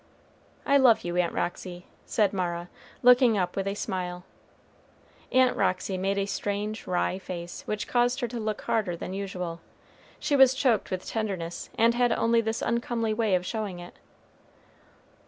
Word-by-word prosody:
"I 280 - +5
love 255 -5 +5
you, 175 0 -3
Aunt 175 -1 +2
Roxy," 180 0 -4 0.2
said 210 -3 +2
Mara, 175 -2 -2 0.3
looking 245 -2 +6
up 180 -2 -1
with 195 0 -2
a 195 - -1
smile. 180 -3 -4 1.1
Aunt 255 -1 +4
Roxy 185 +1 0
made 195 +2 -1
a 200 - +1
strange 205 +2 -3
wry 185 +1 0
face, 175 -2 -7
which 210 0 -3
caused 245 +1 +2
her 240 - 0
to 235 0 -5
look 215 -1 -3
harder 195 -6 0
than 180 - -6
usual. 180 -4 -4 0.6
She 290 - 0
was 265 -1 +6
choked 255 -5 +1
with 185 -1 -4
tenderness, 190 -6 -4
and 230 +1 +4
had 245 0 +2
only 230 0 +3
this 220 0 -2
uncomely 235 -1 0
way 215 -3 +2
of 180 0 -1
showing 210 -3 -3
it. 175 0 -10
200 Hz, 160 wpm, -27 LUFS, 180-230 Hz, 1.1 s, looking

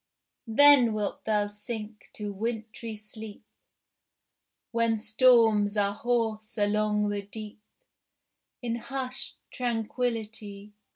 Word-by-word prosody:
Then 255 0 +7
wilt 210 -1 -3
thou 210 -1 +2
sink 210 +1 -7
to 210 -1 -5
wintry 225 +1 -4
sleep, 215 0 -10 1.3
When 230 -1 +2
storms 220 -2 +4
are 200 -1 +2
hoarse 225 -1 -1
along 210 0 +1
the 205 0 -2
deep, 210 +1 -9 1.0
In 235 -1 -1
hushed 260 +1 -5 0.2
tranquillity. 225 -4 -3
220 Hz, 95 wpm, -28 LUFS, 210-235 Hz, 1.3 s, Then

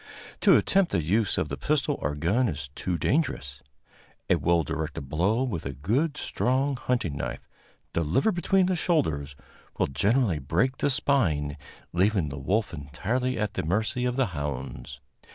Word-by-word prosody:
To - - +6
attempt 195 -2 +2
the 85 - +1
use 105 +6 +1
of - - 0
the 70 - -4
pistol 150 -1 0
or 75 +2 -1
gun 100 - +2
is 70 -4 -5
too 90 +3 -2
dangerous. 80 - -1 0.7
A - - +7
well 85 -1 +2
directed 80 -3 -4
blow 100 - +1
with 105 -12 -3
a 70 - -4
good 125 - 0
strong 135 +3 0
hunting 120 - -1
knife, - - -5 0.5
delivered 85 - +2
between 185 +2 +2
the 185 0 +1
shoulders, 80 - 0 0.4
will - - +3
generally 100 - +1
break 90 - 0
the - - +1
spine, 85 - +1 0.4
leaving 95 -3 +2
the 70 0 -6
wolf 100 +8 0
entirely 110 - -2
at 105 -2 -1
the - - -1
mercy 110 +8 0
of 125 -1 0
the 135 0 +2
hounds. 70 -2 -5
95 Hz, 160 wpm, -27 LUFS, -, 0.7 s, A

